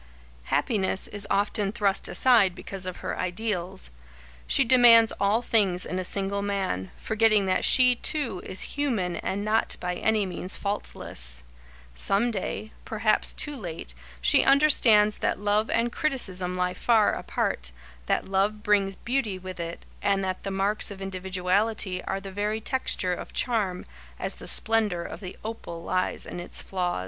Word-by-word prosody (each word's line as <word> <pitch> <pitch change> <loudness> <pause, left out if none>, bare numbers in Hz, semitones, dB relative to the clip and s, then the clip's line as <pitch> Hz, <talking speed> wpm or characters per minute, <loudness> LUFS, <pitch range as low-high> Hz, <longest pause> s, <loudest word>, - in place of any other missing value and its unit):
Happiness 190 - 0
is 205 0 -2
often 200 0 0
thrust 205 -3 +1
aside 225 -8 +3
because 195 -1 -5
of 185 - -5
her - - -3
ideals. 185 - -3 0.6
She 275 - +4
demands 235 -2 +6
all 210 +4 +2
things 195 -6 +2
in 185 - -3
a - - -2
single 200 +2 -2
man, 195 - -2
forgetting 220 -2 +2
that 185 - +1
she, 250 -1 +6
too, 240 -7 -1
is 185 - -6
human 225 -12 -1
and 200 +2 -3
not 220 +1 0
by 180 0 -3
any 215 +3 +1
means 185 +1 -2
faultless. - - -3 0.5
Some 200 - +1
day, 215 +1 -4
perhaps - - +1
too 295 -1 -3
late, 170 - -7 0.3
she - - +5
understands 245 -7 +5
that - - -1
love 205 +2 +1
and 235 +1 +1
criticism 185 -13 -2
lie 180 0 0
far 220 +2 +3
apart, - - -3 0.4
that - - 0
love 200 +2 0
brings 200 -2 +2
beauty 235 -5 -2
with 185 0 -8
it, 170 0 -6 0.2
and 195 -1 +1
that 185 -1 -3
the - - -4
marks 195 +2 +1
of 200 -2 -9
individuality 190 +1 -1
are 195 - -2
the 195 0 -9
very 210 +3 -2
texture 220 -6 0
of - - -7
charm, 210 -7 -1 0.3
as - - -4
the - - -10
splendour 215 -6 +4
of - - -8
the 185 -2 -8
opal 195 -7 -6
lies 185 +1 -2
in - - -7
its 175 - -4
flaws. 180 - -2
200 Hz, 155 wpm, -26 LUFS, 185-220 Hz, 0.6 s, demands